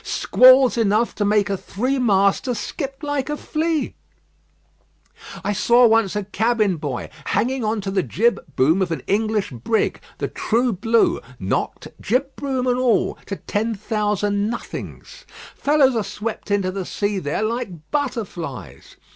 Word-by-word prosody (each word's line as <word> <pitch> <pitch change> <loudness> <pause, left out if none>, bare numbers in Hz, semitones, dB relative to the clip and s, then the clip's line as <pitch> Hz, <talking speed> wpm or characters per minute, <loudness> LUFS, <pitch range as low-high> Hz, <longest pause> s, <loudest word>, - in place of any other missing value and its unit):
Squalls 255 -1 +5
enough 220 +2 +2
to 210 - -2
make 205 0 +2
a 200 - -1
three 255 +8 -2
master 200 +2 +2
skip 275 +5 -5
like 290 -2 -2
a 295 - -2
flea. 315 0 -1 1.5
I 205 - 0
saw 240 +4 +5
once 225 -3 +3
a 210 - -1
cabin 215 -1 +1
boy 145 -5 -4 0.2
hanging 255 +2 0
on 215 0 -1
to 195 0 -4
the 190 -1 +1
jibboom 175 - +1
of 185 - 0
an 165 - -3
English 215 -2 0
brig, 125 - -1 0.2
the - - -2
True 235 +1 0
Blue, 225 +5 +2 0.2
knocked, 95 - -2
jibboom 265 +2 -1
and 250 0 +1
all, 250 -3 +1
to 200 - -3
ten 220 +3 -2
thousand 205 -1 -1
nothings. 240 - -7 0.3
Fellows 280 -3 +3
are 225 - +1
swept 215 +1 -5
into 200 -2 +1
the 190 -1 -5
air 205 -1 +1
there 150 +7 -2
like 215 -9 -4
butterflies. 175 - -4
215 Hz, 145 wpm, -21 LUFS, 195-250 Hz, 1.5 s, Squalls